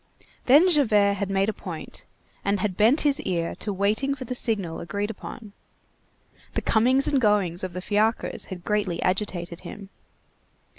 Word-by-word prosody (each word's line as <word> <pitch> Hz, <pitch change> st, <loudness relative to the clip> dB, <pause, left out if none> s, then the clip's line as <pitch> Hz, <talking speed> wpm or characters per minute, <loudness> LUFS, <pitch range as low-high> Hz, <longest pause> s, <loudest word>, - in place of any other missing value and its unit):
Then 290 Hz, +8 st, +7 dB
Javert 215 Hz, -, +4 dB
had 200 Hz, 0 st, -2 dB
made 195 Hz, 0 st, +1 dB
a 220 Hz, -, 0 dB
point -, -, -7 dB, 0.4 s
and 200 Hz, 0 st, +1 dB
had 185 Hz, -1 st, -1 dB
bent 225 Hz, -, +4 dB
his 290 Hz, 0 st, +1 dB
ear 170 Hz, -, -2 dB
to 210 Hz, -, -2 dB
waiting 210 Hz, +8 st, 0 dB
for 260 Hz, -2 st, -7 dB
the 250 Hz, -, -4 dB
signal 205 Hz, -9 st, -2 dB
agreed 200 Hz, +5 st, -3 dB
upon. 215 Hz, -1 st, -10 dB, 1.0 s
The -, -, -1 dB
comings 255 Hz, +5 st, +3 dB
and 275 Hz, -3 st, +2 dB
goings 200 Hz, -6 st, +2 dB
of 185 Hz, -2 st, -4 dB
the 180 Hz, +1 st, -5 dB
fiacres 215 Hz, +3 st, 0 dB
had 180 Hz, -3 st, -9 dB
greatly 205 Hz, -5 st, 0 dB
agitated 180 Hz, -3 st, -2 dB
him. 200 Hz, -1 st, -10 dB
205 Hz, 160 wpm, -25 LUFS, 190-235 Hz, 1.0 s, Then